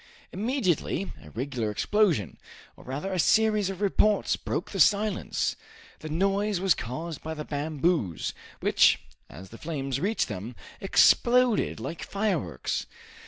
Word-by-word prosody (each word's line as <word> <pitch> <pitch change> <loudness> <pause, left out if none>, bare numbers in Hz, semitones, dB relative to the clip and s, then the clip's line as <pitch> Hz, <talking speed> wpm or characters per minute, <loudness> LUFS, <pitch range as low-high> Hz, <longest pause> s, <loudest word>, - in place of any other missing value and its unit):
Immediately, 195 - -1
a 75 - -13
regular 120 - -3
explosion, 155 - +1 0.4
or - - -15
rather 145 +9 -4
a 185 - -1
series 215 +1 +3
of 195 0 -6
reports, 210 +1 +2
broke - - -4
the - - -4
silence! 205 -1 +2 0.4
The 155 - -7
noise 195 +4 +1
was 190 -2 +4
caused 150 +6 -6
by 160 0 -5
the 150 -1 -6
bamboos, 145 - -1 0.3
which, - - +4 0.3
as 90 +5 -11
the 115 - -11
flames 135 -5 -3
reached 210 +5 0
them, 110 +7 -6 0.3
exploded 240 +4 +4
like 165 - -6
fireworks. 185 - -2
170 Hz, 130 wpm, -27 LUFS, 135-205 Hz, 0.4 s, was